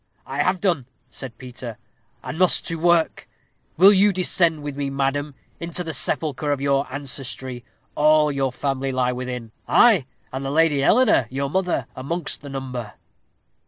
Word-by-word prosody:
"I 135 +2 -2
have 185 +4 +1
done," 170 -11 0 0.2
said 120 -4 -7
Peter, 125 -2 -8 0.5
"and 160 - -6
must 185 -1 +3
to 165 -1 -3
work. 170 -1 +2 0.5
Will 195 +5 +8
you 200 +1 +5
descend 170 -4 +2
with 145 -1 -5
me, 140 -1 -2
madam, 140 +1 -1 0.2
into 170 +1 -3
the 160 -2 -5
sepulchre 150 +1 -1
of 145 - 0
your 140 -1 0
ancestry? 130 -2 -5 0.3
All 150 0 +4
your 135 -2 -1
family 135 +1 -2
lie 130 -1 +1
within 125 -2 -5 0.2
ay, 205 - +5 0.3
and 135 +1 -4
the 135 - -3
Lady 150 -1 +3
Eleanor, 210 - +4
your 135 +1 -3
mother, 180 -8 0
amongst 165 +6 -3
the 145 - -9
number." 130 -5 -5
140 Hz, 160 wpm, -22 LUFS, 130-165 Hz, 0.5 s, Will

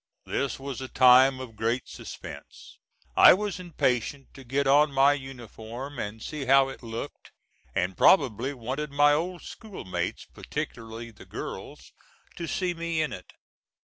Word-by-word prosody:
This 140 -2 -2
was 135 -1 -6
a 130 - -5
time 130 +1 +6
of 125 -4 -8
great 115 +4 -1
suspense. - - -10 0.4
I - - +9
was 200 -1 -3
impatient 140 -5 -2
to 135 - -12
get 135 +3 -1
on 145 +2 +5
my 135 +1 +5
uniform 130 0 -8
and 105 +2 -5
see 150 -3 -5
how 135 +1 +5
it 135 - -9
looked, 115 +4 -7 0.5
and 95 0 0
probably 130 - +4
wanted 135 +4 -4
my 145 +1 +4
old 175 +4 -2
school 215 - -9
mates, 95 - -3
particularly 115 +1 -6
the 105 - -16
girls, - - -8 0.4
to 170 - -4
see 180 +2 -1
me 165 -1 -2
in 155 -1 0
it. 90 - -10
135 Hz, 150 wpm, -27 LUFS, 120-145 Hz, 0.5 s, I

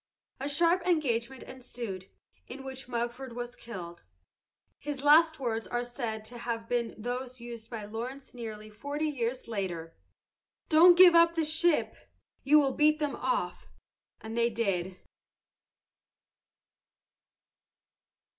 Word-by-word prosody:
A 275 +2 -3
sharp 340 +4 +3
engagement 265 -7 0
ensued, 235 -7 -7 0.4
in 265 +2 -9
which 265 -1 -7
Mugford 240 +1 -4
was 240 0 -6
killed. 175 -7 -9 0.8
His 285 -1 -5
last 315 +2 +6
words 230 -4 -2
are 240 0 -2
said 235 -3 -5
to 240 +2 -10
have 230 -1 -4
been 240 -1 -1
those 250 +3 -5
used 235 -2 -9
by 220 -3 -6
Lawrence 240 +6 -7
nearly 215 -3 -8
forty 285 +8 -4
years 255 -4 -2
later: 180 -7 -4 0.7
"Don't 345 +2 +7
give 360 -1 +9
up 335 0 +5
the 325 - +1
ship! 315 +1 +2 0.5
You 300 +3 +6
will 275 -2 +1
beat 305 +2 +4
them 295 -2 -2
off!" - - -2 0.5
And 220 +1 -7
they 235 0 +2
did. 190 -5 -2
245 Hz, 125 wpm, -30 LUFS, 225-290 Hz, 0.8 s, give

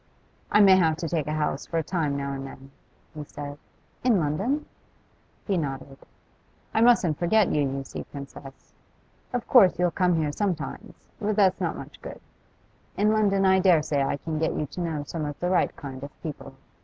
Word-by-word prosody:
'I 210 - +6
may 190 -2 +8
have 160 -4 +2
to 170 -1 -3
take 155 -3 -1
a 150 - -1
house 150 -2 -2
for 165 - -2
a 165 - +1
time 150 -4 -1
now 140 0 -3
and 135 0 -5
then,' 135 0 -12 0.4
he 150 - -6
said. 145 0 -8 0.4
'In 240 -6 +4
London?' 195 - -1 0.8
He 195 -3 0
nodded. 135 -3 -4 0.8
'I 220 - +2
mustn't 230 -10 +4
forget 200 +3 +3
you, 150 - +2
you 135 -1 -1
see, - - -7
Princess. 140 -1 -11 0.6
Of 245 -2 -3
course 205 -8 +6
you'll 180 0 +2
come 180 +1 +2
here 155 -2 0
sometimes, 180 0 -4
but 215 -1 -1
that's 195 -3 +3
not - - -1
much - - -10
good. - - -8 0.8
In 210 +1 +3
London 200 -3 +2
I 190 0 +5
dare 180 -5 +4
say 145 -2 0
I 135 +1 0
can 155 +1 -4
get 160 - 0
you 150 - -1
to 180 - -5
know 160 -4 -2
some 155 +2 -5
of 145 -1 -5
the 180 +1 -1
right 185 - +2
kind 135 -3 -8
of 140 0 -11
people. 135 -3 -7
160 Hz, 195 wpm, -26 LUFS, 145-190 Hz, 0.8 s, may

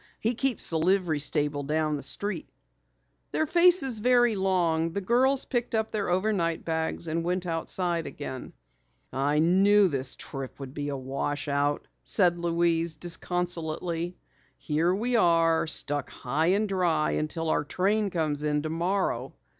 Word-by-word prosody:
He 230 +3 0
keeps 255 -4 -2
the 160 - +1
livery 175 -2 +1
stable 145 0 -1
down 155 +1 0
the 145 - -5
street." 195 +5 0 0.8
Their 315 - 0
faces 340 -7 +4
very 240 0 +3
long, 170 -4 +1
the 200 - -1
girls 255 +7 +2
picked 240 -3 -2
up 220 0 -1
their 205 -3 -2
overnight 180 -3 0
bags 160 +1 -2
and 165 +1 -1
went 180 +1 -1
outside 170 0 -1
again. 135 -2 -7 0.6
"I 140 +3 +1
knew 195 +5 +4
this 135 -3 -2
trip 135 -2 -7
would 135 -1 -8
be 145 0 -4
a 140 - -3
wash 140 +3 -3
out," 145 0 0 0.2
said 175 -4 +3
Louise 170 -1 +1
disconsolately. 175 0 -2 0.4
"Here 160 +3 0
we 235 +6 0
are, 165 -4 +3
stuck 145 -2 0
high 150 +6 -1
and 200 +4 +2
dry 175 -6 +1
until 160 +1 -2
our - - +1
train 200 +7 0
comes 155 -4 -1
in 150 -1 0
tomorrow." 165 -5 -1
170 Hz, 145 wpm, -27 LUFS, 150-195 Hz, 0.8 s, faces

